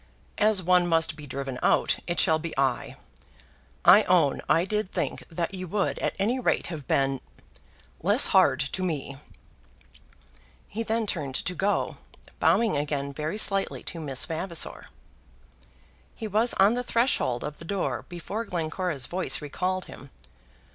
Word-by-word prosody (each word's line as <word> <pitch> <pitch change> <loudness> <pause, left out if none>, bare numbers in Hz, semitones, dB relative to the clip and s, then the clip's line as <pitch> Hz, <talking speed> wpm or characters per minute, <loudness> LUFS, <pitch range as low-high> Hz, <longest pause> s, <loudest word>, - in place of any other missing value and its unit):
As 210 -3 +3
one 180 0 +4
must 165 -1 +2
be 150 -1 -10
driven 135 -1 -5
out, - - +2
it 175 0 -1
shall 160 0 +3
be 165 -2 -6
I. 135 -2 0 0.9
I - - +9
own - - +3
I 165 +2 +4
did 210 -1 -2
think 170 -7 -2
that 170 +3 -3
you 185 -1 -5
would 200 +3 -1
at - - -1
any 230 +7 +1
rate 250 - +1
have 150 -5 -8
been 135 -1 +1 0.8
less 205 - +4
hard 145 -9 +5
to 140 +7 -3
me." 145 -6 -3 1.5
He 220 - -4
then 225 0 0
turned 145 -9 -3
to 180 - -1
go, 195 +4 0 0.4
bowing 225 -7 +3
again 145 -1 -2
very 155 +6 -3
slightly 195 -2 -1
to 170 - -4
Miss 135 -4 -1
Vavasor. 165 +1 -3 1.3
He 220 - -5
was 220 +4 +1
on 200 +3 +5
the 245 - -1
threshold 235 - +1
of 150 0 -6
the 165 - -10
door 195 +2 -2
before 180 +6 -4
Glencora's 165 - -2
voice 185 +5 0
recalled 185 +5 -2
him. 140 - -12
175 Hz, 150 wpm, -27 LUFS, 145-200 Hz, 1.5 s, I